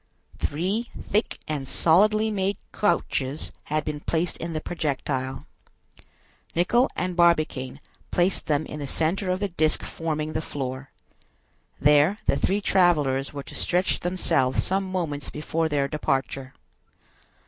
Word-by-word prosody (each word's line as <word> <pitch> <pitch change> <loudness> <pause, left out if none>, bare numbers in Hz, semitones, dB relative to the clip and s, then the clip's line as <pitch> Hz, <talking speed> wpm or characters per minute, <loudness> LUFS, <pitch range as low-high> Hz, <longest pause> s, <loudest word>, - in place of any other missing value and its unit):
Three 195 +10 -1
thick 210 +3 0
and 145 -3 -3
solidly 215 +9 +4
made 195 -1 0 0.2
couches 145 -8 0
had 155 0 -1
been 150 -1 -3
placed 165 +3 -1
in 170 0 -4
the 155 - -1
projectile. 140 -4 -2 1.1
Nicholl 240 +10 +3
and 180 -1 -2
Barbicane 155 -6 +2 0.3
placed 180 +2 +1
them 150 0 +1
in 150 - -7
the 145 - -4
center 180 +7 0
of 185 0 +1
the 205 0 -1
disc 155 -3 +1
forming 155 -1 -3
the 155 - -1
floor. 135 -2 -5 0.9
There 150 +7 +5
the - - +3
three 200 +2 +1
travelers 150 -9 +3
were 140 -1 -6
to - - -11
stretch 180 +2 +1
themselves 170 -8 +1
some 195 +1 +1
moments 155 -6 -2
before 160 +2 -1
their 140 -2 +1
departure. 135 -3 -2
155 Hz, 135 wpm, -25 LUFS, 145-185 Hz, 1.1 s, There